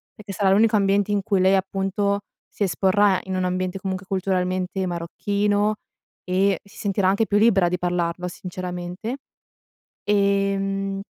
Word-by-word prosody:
perché 210 -1 -9
sarà 195 0 +2
l'unico 215 +3 +4
ambiente 200 0 +2
in 200 -1 0
cui 195 -2 +1
lei 190 +1 +5
appunto 195 +1 0 0.3
si - - -18
esporrà 195 +1 +3
in 190 0 -4
un 185 0 0
ambiente 185 +1 -2
comunque 190 -1 -4
culturalmente 185 0 -1
marocchino, 205 +5 0 0.5
e 190 0 +1
si 200 - -18
sentirà 200 -3 0
anche 205 +3 +2
più 205 - +2
libera 200 -5 +4
di 180 - -1
parlarlo 175 0 -1
sinceramente. 180 +5 -6 0.9
Ehm, 195 -1 0
195 Hz, 140 wpm, -23 LUFS, 185-200 Hz, 0.9 s, lei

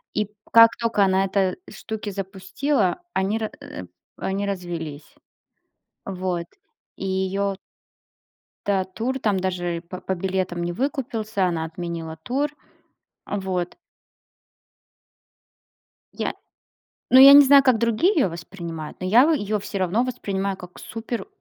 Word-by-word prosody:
И 210 -1 0 0.2
как 230 0 +9
только 230 -3 +2
она 190 0 +3
эта 190 -1 +1
штуки 220 -1 -6
запустила, 195 - -1
они 195 +3 0
ра, 220 -1 -3
э, 285 0 -8 0.3
они 195 +1 -2
развелись. 170 -6 -5 0.9
Вот. 185 -3 -3 0.5
И - - -6
её 190 +1 -1 1.1
Да, 195 -2 +2
тур 225 +8 -3
там, 205 -3 +2
даже 175 -2 -2
по 185 - -7
по 190 - -2
билетам 185 -1 -2
не 175 0 -2
выкупился, 225 - -1
она 170 -3 -1
отменила 165 -1 -5
тур. 265 - -1 0.8
Вот. 190 -3 -3 2.4
Я - - -2 0.8
ну 260 - +8
я 275 +1 +11
не 285 - +11
знаю, 280 +1 +7
как 255 -4 +4
другие 235 - +2
её 280 - +3
воспринимают, 165 -2 -7
но 185 - -3
я, 235 +9 +6
вот, 325 - +3
её 210 -4 -1
всё 205 0 -5
равно 190 +5 +1
воспринимаю 200 -6 -2
как 180 -1 -12
супер. 225 +1 -5
195 Hz, 130 wpm, -23 LUFS, 180-225 Hz, 2.4 s, я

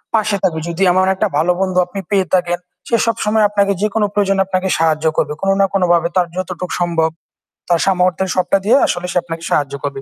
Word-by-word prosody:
পাশে 215 -2 +1
থাকবে। 165 -4 +1
যদি 170 +3 -1
এমন 185 +1 +3
একটা 215 +3 0
ভালো 170 +4 +2
বন্ধু 185 -1 -1
আপনি 195 +2 -6
পেয়ে 190 -3 +2
থাকেন, 175 -1 +1 0.3
সে 235 - +1
সবসময় 215 -1 +1
আপনাকে 200 -1 +1
যেকোন 210 +1 0
প্রয়োজনে 195 -1 +1
আপনাকে 190 0 -1
সাহায্য 160 -1 +1
করবে। 150 0 0
কোন 195 - 0
না 195 - +5
কোন 195 - +1
ভাবে 170 0 +2
তার 180 -2 +2
যতটুক 180 -1 -4
সম্ভব। 165 -2 +1 0.6
তার 170 -1 +3
সামর্থ্যের 185 -1 +1
সবটা 185 +1 +2
দিয়ে 245 +6 +5
আসলে 175 0 -2
সে - - -1
আপনাকে 165 -1 -7
সাহায্য 140 -2 0
করবে। 140 -1 -4
185 Hz, 205 wpm, -17 LUFS, 170-195 Hz, 0.6 s, না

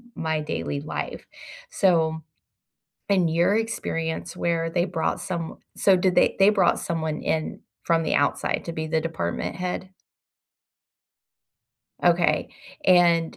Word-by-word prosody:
my 160 -1 -1
daily 150 -1 -3
life," 155 - -5 0.4
so, 160 - +2 0.9
in 190 -3 +3
your 170 +5 +2
experience 180 -8 -3
where 165 -1 0
they 175 +1 +1
brought 175 -3 -1
some 170 -4 -4 0.2
so 195 -2 +4
did 180 0 +1
they - - +3
they 195 +1 +6
brought 195 -4 +3
someone 160 -2 -3
in 160 -1 -2 0.2
from 165 -1 +2
the - - 0
outside 145 0 +1
to 170 - -4
be 160 -1 -4
the 160 0 0
department 120 - -3
head? 180 +1 -4 2.1
Okay, - - +3 0.4
and 170 - +4
165 Hz, 125 wpm, -24 LUFS, 160-180 Hz, 2.1 s, they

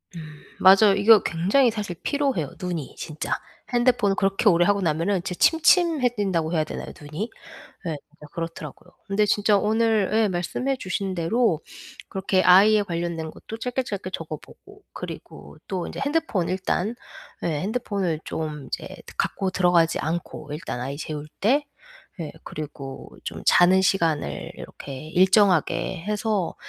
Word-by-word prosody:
음 165 - -6 0.4
맞아요. 195 +2 +7
이거 210 +1 +7
굉장히 205 +10 +2
사실 205 -5 -4
피로해요 275 - 0
눈이 175 -6 -4
진짜. 155 -2 -6 0.4
핸드폰을 240 -5 +3
그렇게 195 +2 +3
오래 175 -1 +4
하고 200 +1 +2
나면은 170 +3 0
진짜 180 - -3
침침해진다고 245 - +2
해야 160 -3 +1
되나요, - - -6
눈이? 155 +10 -5 0.6
예 160 -2 -2
진짜 150 0 -15
그렇더라고요. 165 0 -7 0.2
근데 210 +2 +2
진짜 205 0 +3
오늘 220 -1 +2
예 220 -1 +3
말씀해 195 +9 -2
주신 190 -3 -3
대로 175 +1 +2 0.5
그렇게 190 -1 +1
아이에 205 +4 +7
관련된 170 -3 -3
것도 225 - -9
짧게 250 +2 -2
짧게 200 -5 -5
적어 155 -3 -5
보고 405 - -17
그리고 - - -9
또 185 -3 -3
인제 - - -8
핸드폰 285 - 0
일단 190 +3 -1 0.5
예 - - 0
핸드폰을 200 -7 -2
좀 150 -3 -5
이제 - - -4 0.3
갖고 190 -1 0
들어가지 175 -3 +3
않고 165 -1 -4
일단 150 -5 -5
아이 135 +3 -4
재울 150 -1 -5
때. 270 +8 +3 0.6
예. 155 - -4
그리고 140 -3 -8
좀 - - -6
자는 185 +2 +6
시간을 160 - 0
이렇게 140 +2 -9
일정하게 185 0 +3
해서 210 -3 -1
190 Hz, 320 characters per minute, -24 LUFS, 165-215 Hz, 0.6 s, 맞아요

